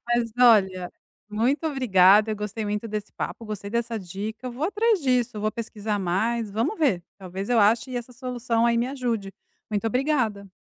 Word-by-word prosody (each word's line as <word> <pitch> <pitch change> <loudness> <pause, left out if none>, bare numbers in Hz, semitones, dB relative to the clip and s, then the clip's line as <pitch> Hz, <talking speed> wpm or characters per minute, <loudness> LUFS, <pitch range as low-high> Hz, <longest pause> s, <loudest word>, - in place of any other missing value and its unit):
Mas, 240 -1 +1
olha, 190 -7 +4 0.4
muito 250 +9 0
obrigada, 215 -7 +5
eu 215 - -2
gostei 210 +1 -4
muito 210 +2 -2
desse 210 -1 -5
papo, 230 - -5
gostei 210 -2 -6
dessa 235 -1 -1
dica, 205 +6 -6
eu 250 - -4
vou 270 +6 -3
atrás 425 +2 +2
disso, 250 -3 +1
eu 210 - -4
vou 215 - 0
pesquisar 215 -2 -3
mais. 210 +5 -1
Vamos 225 - -1
ver, 245 - +2 0.2
talvez 190 +2 -6
eu 245 - +3
ache 225 +5 +3
essa 245 +1 -6
solução 245 -2 -1
aí 235 0 +2
me 240 - +1
ajude. 240 -7 -3 0.4
Muito 210 +1 -1
obrigada. 230 -6 0
225 Hz, 180 wpm, -25 LUFS, 205-250 Hz, 0.4 s, obrigada